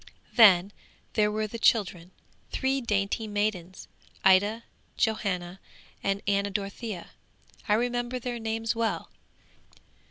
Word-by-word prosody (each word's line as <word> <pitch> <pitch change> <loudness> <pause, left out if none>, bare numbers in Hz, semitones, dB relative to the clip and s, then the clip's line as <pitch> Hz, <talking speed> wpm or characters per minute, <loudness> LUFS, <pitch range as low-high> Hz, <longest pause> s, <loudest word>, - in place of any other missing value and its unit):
'Then 200 -4 +7 0.4
there 210 -1 +2
were 215 +1 -1
the 230 +2 -6
children, 180 -7 +2 0.4
three 270 0 0
dainty 210 -1 -1
maidens, 205 -4 -3 0.4
Ida, 205 +4 +4 0.3
Johanna 190 -5 -1 0.4
and 195 0 -1
Anna 200 0 +1
Dorothea. 200 -1 -5 0.6
I 210 - +5
remember 245 +2 -1
their 245 -1 -4
names 225 0 -2
well. 225 -1 -2
210 Hz, 105 wpm, -27 LUFS, 195-225 Hz, 0.6 s, Then